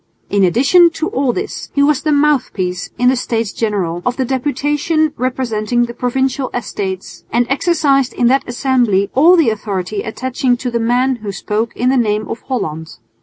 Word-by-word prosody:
In 200 -1 +3
addition 275 - +5
to 320 +3 -2
all 270 -9 0
this 390 - -5
he 280 - +3
was 290 -1 +2
the 305 - 0
mouthpiece 250 -12 0
in 250 +1 +4
the 260 - +2
States 230 -3 -2
General 190 -6 -2
of 250 0 -1
the 260 - 0
deputation 290 +4 0
representing 240 -2 -1
the 235 - -8
Provincial 260 +2 -1
Estates, 195 -5 -5
and 240 +2 +2
exercised 275 -4 +2
in 240 - -1
that 265 +3 +3
assembly 240 -6 +1
all 325 +7 +6
the 320 -10 +3
authority 200 -2 -3
attaching 250 +2 -1
to 250 0 -4
the 235 - 0
man 245 +3 +1
who 210 -3 -6
spoke 215 +3 -3
in 250 - +1
the 265 - +2
name 215 -2 0
of 230 - -6
Holland. 160 - -4
245 Hz, 175 wpm, -16 LUFS, 215-275 Hz, -, all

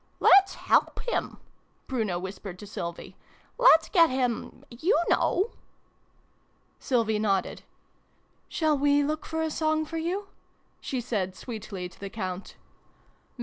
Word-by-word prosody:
" - - -39
Let's 390 0 +6
help - - +2
him! - - -2 0.3
" - - -40
Bruno 220 -9 -1
whispered 190 0 -7
to 205 - -10
Sylvie. 170 -4 -6 0.2
" - - -34
Let's 325 -9 +7
get 335 -4 +5
him 255 -3 -2
you 325 - +1
know! 395 +6 +2 0.7
" - - -40 0.3
Sylvie 225 -4 +1
nodded. 200 -3 0 0.5
" - - -40
Shall 310 -2 +1
we 285 +1 +3
look 305 +2 -3
for 320 0 -2
a 320 - -1
song 315 0 0
for 330 +2 -5
you? 380 +5 -3 0.2
" - - -41
she 260 -2 -3
said 200 -6 -2
sweetly 200 -5 -6
to 180 - -19
the 200 - -6
Count. 190 -2 -5
250 Hz, 150 wpm, -27 LUFS, 200-315 Hz, 0.7 s, Let's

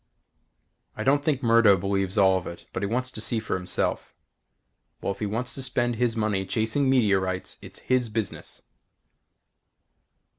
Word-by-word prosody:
I - - -2
don't 140 +2 +3
think 145 -3 0
Murdo 115 -4 +5
believes 95 +1 -1
all 95 -2 +5
of 95 -1 -3
it 85 - -9
but - - -3
he 100 - 0
wants 125 +4 -2
to - - -8
see 115 - +1
for 110 - -4
himself. 90 -1 -2 0.8
Well, - - -2
if 100 - -7
he 105 - -1
wants 115 +5 -3
to 135 - -5
spend 120 -2 0
his 120 -1 +1
money 105 -3 0
chasing 110 +7 0
meteorites 95 -7 +1
it's - - -11
his 125 -2 +2
business. 105 -3 -4
110 Hz, 160 wpm, -26 LUFS, 95-125 Hz, 0.8 s, Murdo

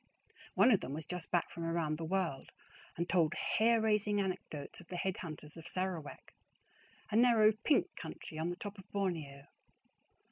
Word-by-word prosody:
One 205 +7 +6
of 205 - +5
them 135 - -5
was 155 +1 -4
just 180 -2 -5
back 175 -2 +1
from 170 - -6
around 165 -2 0
the - - -3
world, 170 -6 -1 0.5
and 170 +1 -1
told 170 -2 +3
hair 230 +4 +3
raising 210 -1 +2
anecdotes 180 -6 -4
of 175 - -16
the 180 - -5
head 190 +1 -1
hunters 155 -2 -7
of 165 0 -9
Sarawak, 185 -5 -4 0.8
a - - 0
narrow 225 -2 +6
pink 220 +8 +1
country 155 - -7
on 165 +2 0
the 175 - -2
top 205 +2 -7
of 190 - -14
Borneo. 160 -8 -2
180 Hz, 175 wpm, -34 LUFS, 160-205 Hz, 0.8 s, One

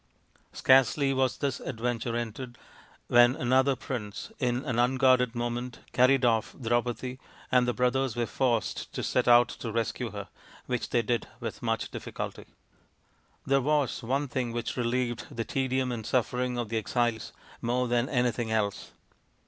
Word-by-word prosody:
Scarcely 135 +2 +4
was 130 -1 +1
this 140 -2 -2
adventure 120 -1 -3
ended, 120 +1 -5 0.5
when 120 +1 +6
another 130 +2 +3
prince, 120 - -6
in 125 +1 0
an 125 -4 -1
unguarded 125 -1 +3
moment, 120 +1 -3
carried 130 +1 +4
off 115 -2 +1
Drau 120 -1 +2
padi, 125 +2 -5 0.3
and 125 -1 +4
the 125 - +1
brothers 125 0 +1
were 120 0 0
forced 120 -3 -1
to - - -3
set 125 - +1
out 120 0 +7
to 115 - -6
rescue 115 -1 -2
her, - - -7 0.4
which 125 -2 -2
they 120 - +2
did 120 +1 -1
with - - -6
much - - -1
difficulty. - - -6 1.0
There 135 0 +3
was 145 -1 +1
one 135 +5 -1
thing 125 -2 -2
which 120 0 -3
relieved 120 -1 -1
the 115 -1 -4
tedium 130 +1 0
and 115 -2 -4
suffering 125 +1 0
of 120 -3 -3
the 115 - -1
exiles 115 +1 -1 0.3
more 125 +2 0
than 120 +1 +1
anything 120 -3 0
else. 105 -3 -1
125 Hz, 155 wpm, -28 LUFS, 120-130 Hz, 1.0 s, out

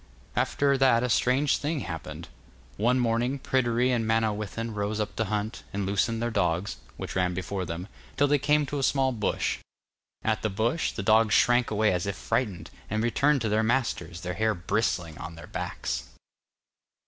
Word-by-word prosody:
After 140 -1 +2
that 125 -3 +4
a 125 - 0
strange 130 +4 +3
thing 150 -1 -2
happened. 80 -3 -6 0.5
One 120 +5 +2
morning 120 +2 +1
Pryderi 125 -1 +1
and 120 -2 +1
Manawyddan 110 0 -1
rose 105 +1 -2
up 105 - -2
to 110 - +1
hunt, 105 +2 -2
and 100 0 -2
loosened 110 +4 0
their 120 - -1
dogs, 90 -2 0 0.2
which - - -6
ran 90 -1 +1
before 95 +1 -3
them, 85 +2 -5 0.3
till 145 - +4
they 145 0 +3
came 150 +2 +3
to 145 +1 -3
a - - -1
small 135 0 +2
bush. 110 -4 -1 0.6
At 110 -1 +1
the 110 - 0
bush, 115 +11 0
the 100 - -5
dogs 110 +1 +4
shrank 120 0 +4
away 105 -1 +2
as 90 +2 -1
if 100 - -2
frightened, 105 -9 -2 0.2
and 110 +1 0
returned 140 +4 +2
to 110 - 0
their 105 +1 +2
masters, 110 -8 -1
their 90 0 -3
hair 110 +2 +1
brisling 90 -4 -1
on 80 0 -7
their 85 - -10
backs. - - -4
110 Hz, 180 wpm, -27 LUFS, 100-125 Hz, 0.6 s, that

